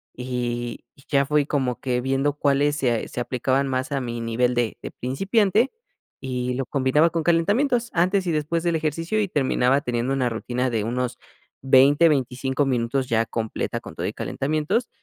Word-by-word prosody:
Y 120 -1 -4
y 135 - -20
ya 140 -1 +2
fui 150 0 +2
como 130 -5 -1
que 125 -2 -1
viendo 135 +2 0
cuáles 145 0 +2
se 120 -6 0
se - - -6
aplicaban 130 +3 0
más 130 +2 -2
a 135 -1 -1
mi 120 -1 -4
nivel 120 +2 +1
de 120 -2 0
de - - -7
principiante 200 - +1 0.5
y 125 -1 -2
lo 135 -1 -2
combinaba 140 +5 +2
con 165 -1 -2
calentamientos 230 - +2
antes 185 +2 +2
y - - +1
después 160 +3 -1
del 170 -1 +1
ejercicio 165 +7 -1
y 200 - 0
terminaba 135 -2 +2
teniendo 125 -1 -2
una 130 -2 +1
rutina 125 +3 -2
de 110 -3 -1
unos 125 +2 -2 0.4
20, 140 +5 +5
25 130 0 0
minutos 125 +1 0
ya 115 0 +1
completa 110 -1 -3
con - - -11
todo - - -4
y - - -3
calentamientos 155 - -1
135 Hz, 175 wpm, -23 LUFS, 125-155 Hz, 0.5 s, 20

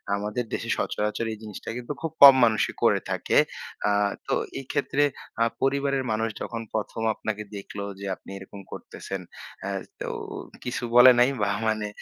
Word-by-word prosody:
আমাদের 105 +4 -2
দেশে - - -3
সচরাচর 105 +2 -1
এই 110 - -8
জিনিসটা 105 -3 -8
কিন্তু 125 +4 -4
খুব 165 - -2
কম 140 -1 +13
মানুষই 110 -1 +1
করে - - +5
থাকে। - - +1 0.5
আ - - +3 0.4
তো - - 0 0.3
এইক্ষেত্রে 140 +2 0 0.4
আ - - +7 0.2
পরিবারের 140 0 +1
মানুষ 110 +1 0
যখন 115 -1 -4
১ম 110 +1 -3
আপনাকে 105 0 -4
দেখলো 100 0 -6 0.2
যে, 100 - -6
আপনি - - -17
এরকম 100 +1 -10
করতেছেন 95 -1 -7 0.4
অ্যা 100 - -3 0.3
তো - - -3 0.6
কিছু 125 0 -3
বলে 125 +1 +10
নাই 125 +2 +6
বা 100 - +2 0.2
মানে 110 -1 0
110 Hz, 160 wpm, -26 LUFS, 105-130 Hz, 0.6 s, কম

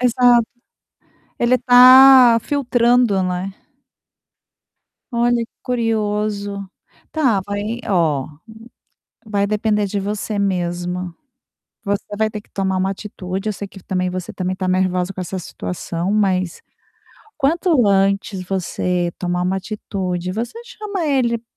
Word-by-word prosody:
Exato. 245 -1 +4 0.9
Ele 245 +1 +3
tá 255 -1 +8
filtrando, 245 -6 +2
né. 185 +1 -3 1.6
Olha, 235 0 +2 0.2
curioso. 210 -4 -2 0.5
Tá, 260 -10 +2
vai 205 +4 -3
ó, 160 -8 +1 1.0
vai 205 -2 -1
depender 210 0 0
de 200 +1 -2
você 205 +1 -3
mesma. 180 -2 -2 0.7
Você 200 0 -1 0.2
vai 220 - +2
ter 210 -1 -6
que - - -27
tomar 190 -1 -1
uma 190 +1 0
atitude, 195 0 -5
eu - - 0
sei 200 0 -7
que 195 - -13
também 185 0 -2
você 185 -1 -5
também 185 0 -3
tá 185 - -3
nervosa 185 0 0
com 185 - -7
essa 185 +1 -4
situação, 175 +1 -5
mas 185 -4 0 0.8
quanto 310 - +2
antes 195 -1 +1
você 180 -2 -1
tomar 180 0 -1
uma 185 +2 0
atitude, 185 -3 -4
você 230 - -4
chama 420 -6 -5
ele, 245 -5 +1
200 Hz, 120 wpm, -19 LUFS, 185-235 Hz, 1.6 s, tá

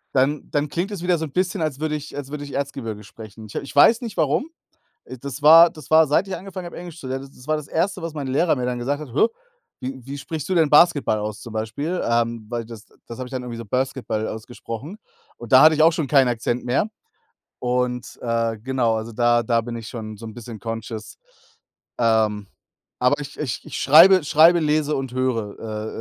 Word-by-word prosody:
Dann 140 +3 +1
dann 145 0 -1
klingt 180 +6 -2
es 195 - -5
wieder 180 -1 +2
so 160 - -3
'n 145 - -10
bisschen, 185 +1 -1
als 150 -4 -2
würde 155 0 -1
ich 150 -1 -7
als 140 0 -6
würde 150 -1 -5
ich 145 - -9
Erzgebirge 135 -7 -4
sprechen. 110 +1 -12
Ich 105 - -13
ich 140 - -6
weiß 225 - +6
nicht 230 -4 -6
warum, 160 - +1 0.6
ah, 130 - -7
das 140 0 -6
war 165 +3 +9
das 155 -3 -14
war 160 0 +6
seit 150 +7 +2
ich 195 - -3
angefangen 190 -1 -8
habe 175 - -8
Englisch 170 -2 -9
zu 135 - -8
lernen, 135 +1 -5
das 125 +3 -16
war 155 - +1
das 150 -2 -8
Erste, 185 +3 -1
was 165 -1 -5
mein 145 -3 -4
Lehrer 150 +6 +2
mir 125 -2 -2
dann 125 -1 -2
gesagt 140 +5 -2
hat: 135 -6 -9
„Hä, 150 - +4 0.5
wie 130 0 -6
wie 140 +2 -6
sprichst 150 +3 -6
du 185 - +1
denn 160 -3 +3
Basketball 150 -8 +4
aus?", 105 -1 -5
zum 115 - -9
Beispiel. 125 +11 -3
Ähm, 115 -1 0
weil 120 -1 -3
das 115 -1 -11 0.2
das 115 - -9
habe 130 - -5
ich - - -15
dann 130 -2 -4
irgendwie 120 -1 -6
so 115 - -7
Basketball 125 -2 -2
ausgesprochen 120 - -7 0.4
und 120 -2 -10
da 130 - +8
hatte 155 0 +7
ich 155 - +4
auch 165 - +6
schon 160 -5 -2
keinen 135 -2 +4
Akzent 120 +1 -2
mehr. 130 - +1 0.7
Und, 125 -1 -2
äh, 115 -1 0
genau, 120 0 0
also 110 +1 -5
da 120 +1 +3
da 115 +1 +1
bin 120 +1 -7
ich 115 -2 -7
schon 110 -2 -7
so 115 +2 -10
'n 110 - -9
bisschen 115 -2 -9
conscious. 115 -1 -6 0.8
Ähm, 110 -3 +1 0.5
aber 125 +4 +2
ich 145 0 -8
ich 135 -4 -3
ich - - -7
schreibe 170 +6 +7
schreibe, 165 +4 +5
lese 150 -1 +1
und 135 -2 -4
höre, 110 -4 -3
130 Hz, 225 wpm, -22 LUFS, 115-155 Hz, 0.8 s, war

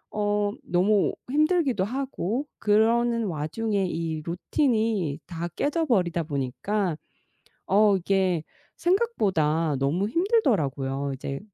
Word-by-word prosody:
어 205 -1 +1
너무 190 +3 +2 0.2
힘들기도 300 - +2
하고 255 +1 -2
그러는 230 +2 +3
와중에 195 +5 -1
이 165 -2 -3
루틴이 210 - 0
다 170 -1 -5
깨져 320 +3 0
버리다 180 - +1
보니까 155 +6 -2 0.7
어 205 0 +4
이게 185 -3 +1 0.3
생각보다 185 - +1
너무 160 +9 +1
힘들더라고요. 150 - 0
이제 135 +1 -5
200 Hz, 235 characters per minute, -26 LUFS, 165-235 Hz, 0.7 s, 어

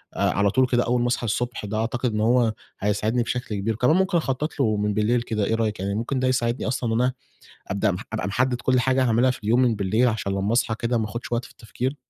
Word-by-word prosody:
على 100 +1 +2
طول 130 -1 +3
كده 120 -1 +2
أول 120 0 +1
ما 120 - +1
أصحى 120 0 -1
الصبح، 120 0 -2
ده 105 +1 -3
أعتقد 120 +2 -1
إن 105 - -1
هو 115 0 +3 0.3
هيساعدني 105 +4 0
بشكل 125 -2 -3
كبير، 105 +3 -1
كمان 125 +8 +3
ممكن 190 -1 +2
أخطَّط 150 0 -2
لُه 110 -6 +2
من 105 0 0
بالليل 110 +3 +1
كده، 110 -3 -1
إيه 115 - +1
رأيِك؟ 110 -3 -1
يعني 100 +1 -2
ممكن 120 +5 -2
ده 130 - +1
يساعدني 120 -2 0
أصلًا 120 -2 -1
إن 115 - +2
أنا 125 +1 +1 0.6
أبدأ 100 +2 +1
مح 90 - -4
أبقى - - -2
محدِّد 125 +4 0
كُلّ 130 -1 +2
حاجة 130 +1 +2
هاعملها 120 +2 +3
في 125 - -6
اليوم 115 +4 +3
من 120 -3 +3
بالليل، 105 +5 +2
عشان 110 -3 -2
لمّا 100 +2 -1
أصحى 115 -1 +1
كده 115 0 0
ما 110 - 0
آخُدش 120 +3 -6
وقت 120 +1 0
في - - -13
التفكير. 125 +4 -4
120 Hz, 250 wpm, -24 LUFS, 105-125 Hz, 0.6 s, طول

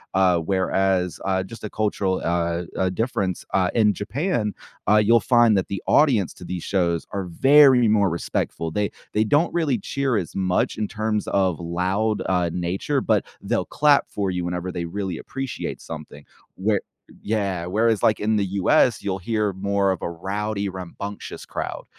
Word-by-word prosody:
Uh, 95 -2 +4
whereas, 95 +1 0
uh, 95 -1 0
just 110 +3 -11
a 105 - -4
cultural, 100 -3 -1
uh 85 0 0
uh, 95 0 +1
difference, 95 -3 -2
uh, 90 -1 +2
in 105 -2 +4
Japan, 110 - -2 0.4
uh, 105 - +6
you'll 110 +2 +5
find 120 -2 +4
that 95 - 0
the 100 - -4
audience 125 - +3
to - - -13
these 90 -1 -5
shows 85 -4 0
are 100 -1 -3
very 135 - +6
more 105 -2 +3
respectful. 85 -1 -3
They 105 +4 -1 0.2
they 105 - +3
don't 145 +9 +2
really 160 -7 +1
cheer 130 +3 -1
as 90 - -4
much 95 -2 0
in 105 -1 -1
terms 110 0 -2
of 95 -4 +1
loud, 95 +5 -1
uh, 90 -2 +1
nature, 90 - -1
but 110 -5 +2 0.2
they'll - - -1
clap 145 -1 +3
for 100 -2 -2
you 90 -1 -2
whenever 90 +1 -3
they 85 -1 -4
really 95 0 -4
appreciate 135 -2 -5
something. - - -9 0.3
Where 100 +1 0 0.4
yeah, 100 -5 -1
whereas, 110 +3 +1
like, 110 - +3
in 110 +1 +1
the 100 -2 +1 0.2
US, 125 0 +3
you'll 95 -2 -2
hear 105 +2 -1
more 100 +1 0
of 95 - -4
a - - -1
rowdy, 100 +4 -3
rambunctious 95 +2 -7
crowd. - - -5
100 Hz, 170 wpm, -23 LUFS, 90-110 Hz, 0.4 s, uh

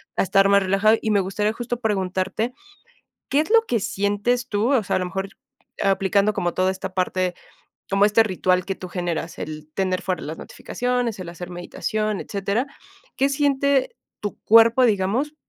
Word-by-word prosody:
a - - +2
estar 195 +1 +4
más 200 0 +5
relajado 195 +4 +3
y 220 - -1
me 205 - +4
gustaría 195 +3 0
justo 240 +1 -4
preguntarte, 195 +2 -1 0.8
¿Qué 280 - +3
es 315 - -5
lo 455 0 +6
que 235 - +1
sientes 205 +5 -1
tú? 220 +6 +1
O 235 -6 +3
sea, - - 0
a - - 0
lo 185 - -1
mejor 190 +2 -4 0.5
aplicando 195 +1 +2
como 175 -2 -1
toda 185 0 +1
esta 190 0 -6
parte, 185 -1 0 0.6
como 195 +1 +4
este 210 +2 +4
ritual 185 -2 +1
que 195 - -2
tú 185 - -8
generas, 175 -2 -3
el 155 0 -7
tener 185 -1 0
fuera 185 -2 -2
las 155 +2 -6
notificaciones, 245 -3 -3
el 185 - -6
hacer 175 +1 -8
meditación, 210 +4 -3
etcétera. 200 +6 -2 0.5
¿Qué 270 - +3
siente 280 - +1 0.3
tu 205 - -5
cuerpo, 230 +3 +6
digamos, 225 +9 0
200 Hz, 175 wpm, -23 LUFS, 185-230 Hz, 0.8 s, lo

